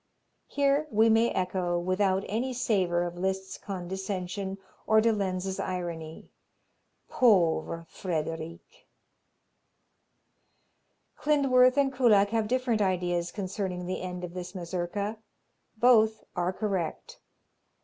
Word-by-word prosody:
Here 285 +2 +1
we 220 -1 +4
may 225 +1 +4
echo, 180 -1 -1
without 185 +2 +1
any 245 +5 -2
savor 190 -8 +1
of 175 0 -5
Liszt's 190 +1 -3
condescension 190 0 -4 0.3
or 220 0 +5
de 225 +1 +3
Lenz's 190 -2 -2
irony: 170 -3 -5 0.8
"Pauvre 170 -7 +2
Frederic!" 165 -1 -5 2.3
Klindworth 270 -3 +4
and 275 -1 +2
Kullak 215 -6 +4
have 225 -1 0
different 245 -2 0
ideas 175 -2 0
concerning 185 -2 -4
the 185 +1 -3
end 180 -1 -5
of 175 -1 -6
this 180 +1 -7
Mazurka. 185 +4 -3 0.6
Both 220 -2 +4
are 180 0 0
correct. 190 -4 -3
190 Hz, 105 wpm, -28 LUFS, 180-220 Hz, 2.3 s, or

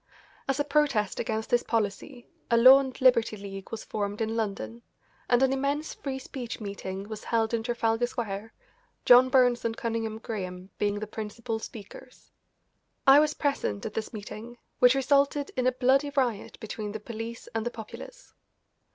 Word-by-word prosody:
As 270 +1 0
a - - +3
protest 285 -8 +1
against 220 0 -2
this 240 - +4
policy 230 +4 -2 0.2
a 235 - +4
Law 260 +3 +9
and 265 -2 -5
Liberty 230 -4 +4
League 195 -1 -8
was 225 -1 -6
formed 205 -1 -3
in 225 0 -1
London, 225 +1 -3 0.5
and 245 +1 +4
an 265 0 +3
immense 280 +3 -1
Free 270 -2 -5
Speech 255 -3 -6
meeting 200 -2 -6
was 215 0 -7
held 225 -1 +1
in 230 - +1
Trafalgar 230 0 0
Square, 220 -3 -5 0.5
John 250 +1 +8
Burns 250 -2 +4
and 230 0 -2
Cunningham 225 -1 -2
Graham 190 -4 -6
being 205 0 +1
the 215 - -4
principal 220 +1 -5
speakers. 225 +3 -11 0.7
I 275 +1 +9
was 300 0 +2
present 190 - -1
at - - -4
this 220 - -4
meeting, 220 +2 -8 0.2
which 250 +1 +6
resulted 280 +1 +2
in 255 0 +1
a - - +4
bloody 265 +3 +2
riot 255 -7 -1
between 210 -1 -5
the 220 - -4
police 225 +1 -7
and 225 -1 -1
the 240 - -1
populace. 240 - -10
230 Hz, 170 wpm, -28 LUFS, 215-260 Hz, 0.7 s, Law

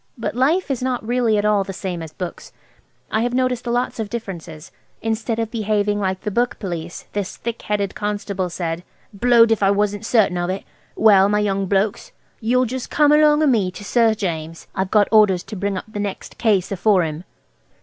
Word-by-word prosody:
But 230 - -3
life 290 +7 +1
is 260 - -2
not 250 -3 -2
really 240 -3 +2
at 205 - 0
all 210 -2 +3
the 195 0 -7
same 180 -2 -4
as 160 -2 -7
books. 180 +1 -7 0.6
I 220 - +1
have 245 +1 -1
noticed 255 -1 0
lots 240 0 -1
of 215 -2 -3
differences. 175 -9 -7 0.3
Instead 225 +1 -1
of 225 -1 -2
behaving 210 -2 0
like 190 -1 -1
the 210 - -3
book 240 +4 0
Police, 170 -3 -6
this 205 -3 -3
thick 235 0 -5
headed 200 -2 -1
constable 205 -3 -3
said– 170 0 -4 0.3
"Blowed 230 +2 +5
if 225 - +2
I 195 - +4
wasn't 205 +1 0
certain 215 -6 +2
of 175 0 -1
it! 190 +1 -3 0.3
Well, 200 -3 +5
my 210 - +2
young 195 -2 0
blokes, 205 - -1 0.3
you'll 250 +3 +2
just 255 +1 -5
come 295 -1 +4
along 300 0 +5
o' - - +4
me 225 -9 +2
to 185 +3 -10
Sir 225 +1 +3
James. 165 -5 -4
I've 190 0 -2
got 210 0 +4
orders 205 -5 +5
to 215 - -8
bring 200 0 -2
up - - -6
the 215 -1 -7
next 205 -1 -5
case 205 -6 +2
afore 195 -1 +3
him." 155 +1 -4
210 Hz, 200 wpm, -21 LUFS, 190-235 Hz, 0.6 s, Blowed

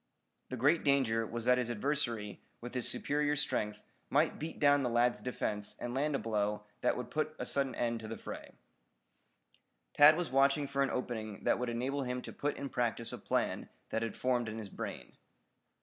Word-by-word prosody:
The 130 - -4
great 145 +7 +3
danger 120 -6 +2
was 120 0 -5
that 125 0 +5
his 120 -1 -1
adversary 120 -3 -1 0.2
with 120 +1 -8
his 125 -2 +1
superior 145 0 +1
strength 105 -7 -1 0.3
might - - +2
beat 160 +2 -5
down 145 -1 +5
the 125 - 0
lad's 120 +1 +2
defense 105 -4 -3
and 120 - -4
land 145 +2 +1
a - - +3
blow 105 -2 -1 0.2
that 125 - +2
would 125 - -5
put 155 0 -1
a - - -3
sudden 135 -3 0
end 120 -1 0
to 110 - -7
the 115 - -5
fray. - - -8 1.4
Tad 155 +2 +8
was 175 -6 -2
watching 140 +2 +4
for 140 0 -1
an 135 - +3
opening 110 -5 -4
that - - +2
would 125 -1 -1
enable 130 +4 -1
him 125 -1 -2
to - - -8
put 145 +1 -2
in 140 - -4
practice 120 -3 -1
a - - -5
plan - - -1 0.2
that 110 - 0
had 115 -2 -3
formed 125 -3 +1
in 110 - -5
his 110 -3 -6
brain. - - -7
125 Hz, 195 wpm, -33 LUFS, 115-140 Hz, 1.4 s, Tad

